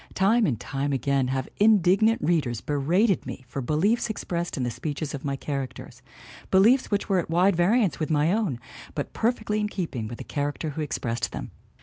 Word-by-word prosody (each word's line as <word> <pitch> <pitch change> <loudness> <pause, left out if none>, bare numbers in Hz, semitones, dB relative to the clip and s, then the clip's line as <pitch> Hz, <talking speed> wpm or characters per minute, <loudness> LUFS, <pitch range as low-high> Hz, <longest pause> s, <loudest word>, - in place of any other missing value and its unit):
Time 210 +3 +3
and 120 -6 -1
time 140 +1 -3
again 135 0 +1
have 130 0 -2
indignant 210 +1 +4
readers 145 -9 +1
berated 165 - +1
me 130 - -7
for 135 +3 -4
beliefs 190 - +1
expressed 175 -6 -3
in 130 - -1
the 120 - -1
speeches 145 +5 -4
of 140 - -6
my 140 -1 -1
characters 135 -1 -6 0.5
beliefs 230 +8 +4
which 205 -1 0
were 195 -2 +2
at 170 - -4
wide 180 +4 +3
variance 195 +2 +2
with 155 - -2
my 155 +3 +2
own, 200 - -1 0.4
but - - -4
perfectly 220 -2 0
in 210 - 0
keeping 150 - -4
with 120 +1 -7
the - - -7
character 145 +2 -3
who 155 - -4
expressed 120 -5 -2
them. - - -6
160 Hz, 190 wpm, -26 LUFS, 135-200 Hz, 0.5 s, indignant